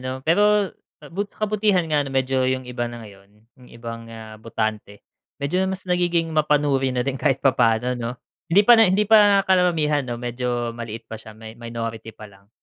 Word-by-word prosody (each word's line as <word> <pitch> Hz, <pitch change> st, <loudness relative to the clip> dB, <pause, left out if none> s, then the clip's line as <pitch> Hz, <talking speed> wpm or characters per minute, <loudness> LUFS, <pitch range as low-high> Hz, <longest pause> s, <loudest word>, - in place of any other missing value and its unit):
'no? 130 Hz, +1 st, -6 dB
Pero 205 Hz, +4 st, +3 dB, 0.4 s
bu 200 Hz, +3 st, -2 dB
sa 215 Hz, -, -4 dB
kabutihan 205 Hz, -4 st, +1 dB
nga 150 Hz, -2 st, +1 dB
'no 140 Hz, -, -6 dB
medyo 130 Hz, 0 st, 0 dB
yung 130 Hz, 0 st, -2 dB
iba 120 Hz, -1 st, -3 dB
na 120 Hz, -1 st, -9 dB
ngayon 100 Hz, -1 st, -16 dB, 0.3 s
yung 125 Hz, -, -16 dB
ibang, 115 Hz, 0 st, -8 dB
ah, 110 Hz, -1 st, -10 dB
botante, 110 Hz, -2 st, -4 dB, 0.3 s
medyo 150 Hz, +7 st, -1 dB
mas 190 Hz, 0 st, -5 dB
nagiging 175 Hz, -2 st, 0 dB
mapanuri 145 Hz, -3 st, +1 dB
na 125 Hz, -, 0 dB
din 135 Hz, 0 st, -1 dB
kahit 135 Hz, -4 st, +2 dB
papaano 120 Hz, -1 st, +2 dB
no. 120 Hz, +1 st, -5 dB, 0.3 s
Hindi 200 Hz, +5 st, +6 dB
pa 240 Hz, -, +8 dB
na 225 Hz, -, +6 dB
hindi 205 Hz, +3 st, +2 dB
pa 205 Hz, -2 st, +5 dB
karamihan 170 Hz, -6 st, +2 dB
no 120 Hz, -2 st, -5 dB
medyo 120 Hz, -1 st, -3 dB
maliit 115 Hz, -1 st, -7 dB
pa 115 Hz, -, -8 dB
siya, 110 Hz, -, -12 dB
may 110 Hz, 0 st, -10 dB
minority 115 Hz, -1 st, -6 dB
pa 110 Hz, -, -13 dB
lang, 100 Hz, 0 st, -21 dB
130 Hz, 190 wpm, -22 LUFS, 115-175 Hz, 0.4 s, pa